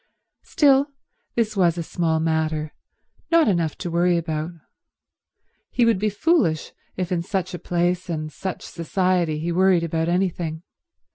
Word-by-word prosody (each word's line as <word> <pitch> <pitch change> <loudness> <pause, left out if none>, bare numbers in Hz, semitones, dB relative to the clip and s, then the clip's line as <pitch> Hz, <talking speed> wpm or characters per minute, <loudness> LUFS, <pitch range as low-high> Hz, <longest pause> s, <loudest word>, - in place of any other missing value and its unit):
Still, 280 -2 +3 0.5
this 220 -2 0
was 175 -3 +3
a 170 - -2
small 160 -1 0
matter, 160 -1 -1 0.6
not 335 -1 +5
enough 170 -6 +1
to 175 - -5
worry 175 +1 +3
about. 160 -1 -2 1.2
He 240 - +2
would 230 -5 +3
be 215 +1 +1
foolish 210 - +1 0.3
if 185 -1 -2
in 175 -2 +1
such 185 +1 -3
a 175 - -5
place 175 +1 -1
and 155 -2 -3
such 190 -1 -5
society 175 -1 0
he 165 +3 -2
worried 185 -1 +3
about 165 0 -1
anything. 175 -3 -1
175 Hz, 145 wpm, -23 LUFS, 160-190 Hz, 1.2 s, not